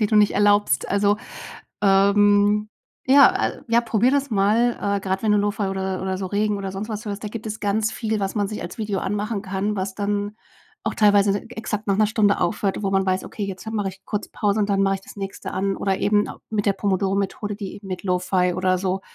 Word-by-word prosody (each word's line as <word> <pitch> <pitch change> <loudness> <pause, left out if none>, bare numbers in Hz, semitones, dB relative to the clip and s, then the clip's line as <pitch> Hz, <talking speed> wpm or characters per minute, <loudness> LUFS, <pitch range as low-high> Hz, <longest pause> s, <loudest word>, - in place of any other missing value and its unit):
die 210 - +3
du 215 - +1
nicht 210 -1 +5
erlaubst. 205 -8 +3
Also, 200 +1 +2 0.7
ähm, 205 +1 +4 0.4
ja, 275 0 +6
äh, - - -10
ja, 235 +1 +4
probier 235 +1 +2
das 280 -1 0
mal. 215 +4 +3 0.3
Äh, - - -9
grad 190 +1 -2
wenn 215 -1 +2
du 210 - +4
Lo-Fi 205 +1 0
oder 190 -1 -3
oder 190 0 -2
so 190 - -3
Regen 205 +2 0
oder 195 -1 -4
sonst 200 +3 -5
was 215 0 -5
hörst, 205 +1 -5
da - - -2
gibt 220 +1 -7
es 215 0 -5
ganz 210 +1 0
viel, 220 -2 -2
was 195 +2 -2
man 205 -2 0
sich 215 - -5
als 175 - -8
Video 205 -3 -2
anmachen 205 +1 -2
kann, 195 +1 -2
was 190 0 -3
dann 205 +1 -2 0.5
auch - - -1
teilweise 205 -1 +4
exakt 220 -2 -4
nach 195 - +2
'ner 215 0 +4
Stunde 210 -2 +2
aufhört, 205 -1 -1
wo 195 - 0
man 195 0 +2
weiß: 185 0 0
„Okay, 205 - -5
jetzt 195 +2 -6
mache 205 -3 -1
ich 190 0 -11
kurz 210 -1 -4
Pause 210 0 0
und 205 - +1
dann 195 0 +2
mache 195 0 +2
ich - - -13
das - - -13
Nächste 195 -1 -6
an.“ 195 +1 -1
Oder 195 -1 -1
eben 205 0 +2
au - - -9
mit 215 -1 -1
der 200 - +4
Pomodoro-Methode, 200 +1 -1
die 200 -3 -6
eben 200 -1 -11
mit 185 -1 -5
Lo-Fi 180 -1 +1
oder 185 0 +1
so 190 +1 -1
205 Hz, 230 wpm, -23 LUFS, 195-210 Hz, 0.7 s, ja